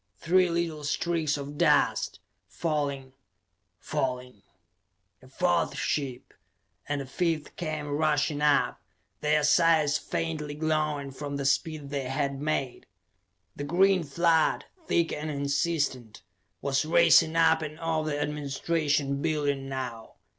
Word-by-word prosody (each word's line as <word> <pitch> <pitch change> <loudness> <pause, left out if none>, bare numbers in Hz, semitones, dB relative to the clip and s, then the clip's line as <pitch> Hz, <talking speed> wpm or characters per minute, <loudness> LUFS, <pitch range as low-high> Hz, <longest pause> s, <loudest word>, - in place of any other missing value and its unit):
Three 180 +1 +3
little 170 -3 -2
streaks 155 0 0
of 145 +1 -7
dust, - - +2 0.3
falling, 140 -5 -3 0.6
falling.... 125 -3 -3 0.8
A 130 - -16
fourth 175 +5 0
ship, 135 -4 -3 0.6
and 145 -1 -1
a - - -6
fifth 160 +3 -2
came 155 -3 -4
rushing 150 0 0
up, 150 -1 +2 0.4
their 150 0 +2
sides 155 -1 +4
faintly 155 -3 -3
glowing 150 -2 -1
from 140 +1 -6
the 140 -1 -3
speed 145 +1 0
they 140 -2 -2
had 140 +1 -2
made. 145 -4 -2 0.7
The 145 - -5
green 185 +4 +3
flood, 160 +2 +2 0.2
thick 170 -1 +1
and 150 +1 -4
insistent, 140 - -1 0.4
was 140 +1 +1
racing 160 +1 +5
up 160 -1 +4
and 155 0 -6
over 160 -2 -1
the 145 -1 -2
administration 145 -1 -1
building 145 -4 -1
now. 125 -4 -6
150 Hz, 120 wpm, -28 LUFS, 140-160 Hz, 0.8 s, racing